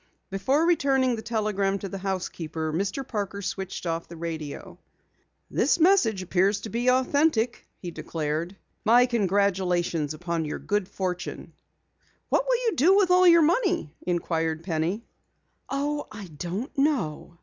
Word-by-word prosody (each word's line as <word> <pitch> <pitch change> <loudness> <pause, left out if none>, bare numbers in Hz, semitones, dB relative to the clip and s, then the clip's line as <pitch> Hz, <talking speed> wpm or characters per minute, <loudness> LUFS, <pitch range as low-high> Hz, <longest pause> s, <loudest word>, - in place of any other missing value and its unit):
Before 260 +12 +1
returning 270 -7 +2
the 220 - -6
telegram 210 -4 0
to 195 - -5
the 195 0 -6
housekeeper, 165 -5 -3
Mr. 200 - -2
Parker 200 -3 -4
switched 190 -1 -4
off 165 0 -2
the 170 - -10
radio. 160 -3 -6 0.7
"This - - +2
message 310 - +4
appears 190 +3 +1
to 220 - -6
be 240 +4 +1
authentic," 255 -2 +2
he 175 - -7
declared. 160 +3 -3 0.3
"My 240 +3 +6
congratulations 185 - +1
upon 170 0 -2
your 150 - -3
good 205 -2 -1
fortune." 180 -2 -4 0.8
"What - - +1
will - - +3
you 445 - +1
do 355 +8 +5
with 385 -3 +3
all 365 0 +6
your 335 -1 +7
money?" 350 - +1
inquired 165 -2 -1
Penny. 170 +6 -2 0.6
"Oh, 290 +2 -2
I 205 -2 -8
don't 180 - -5
know." 240 - 0
200 Hz, 140 wpm, -26 LUFS, 170-260 Hz, 0.8 s, your